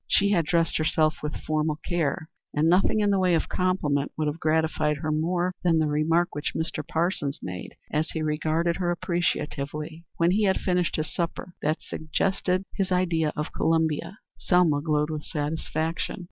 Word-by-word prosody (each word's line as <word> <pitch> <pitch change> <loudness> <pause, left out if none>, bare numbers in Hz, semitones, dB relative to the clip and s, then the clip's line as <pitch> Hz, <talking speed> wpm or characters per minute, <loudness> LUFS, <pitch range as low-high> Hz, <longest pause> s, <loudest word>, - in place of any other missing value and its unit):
She 200 +1 +3
had 170 -6 +2
dressed 165 0 +2
herself 155 0 +2
with 150 0 -3
formal 155 0 0
care, 160 -2 -2 0.3
and 150 +2 +3
nothing 190 +5 +4
in 205 -1 +3
the 195 - +3
way 180 -2 +3
of 160 - 0
compliment 155 -6 0
could 155 - 0
have 150 +2 -2
gratified 155 -1 +1
her 155 +2 -2
more 175 +4 0
than 170 -2 +4
the 160 - +3
remark 160 +4 +1
which 150 +1 -3
Mr. 160 -1 -2
Parsons 160 -4 -1
made, 90 -1 -6 0.2
as 155 +1 0
he 160 - -3
regarded 160 +2 0
her 180 -2 0
appreciatively, 160 -3 -2
when 170 +1 +3
he 210 +3 +3
had 190 -1 +2
finished 180 -2 +1
his 155 - -3
supper, 175 +1 -3
that 155 +2 +1
she - - -16
suggested 185 +3 0
his 195 -2 -1
idea 170 -4 +2
of 150 - -3
Columbia. 160 +3 0 0.2
Selma 175 -5 +3
glowed 150 0 +1
with 155 -1 -3
satisfaction. 160 +3 -2
160 Hz, 175 wpm, -26 LUFS, 150-175 Hz, 0.3 s, nothing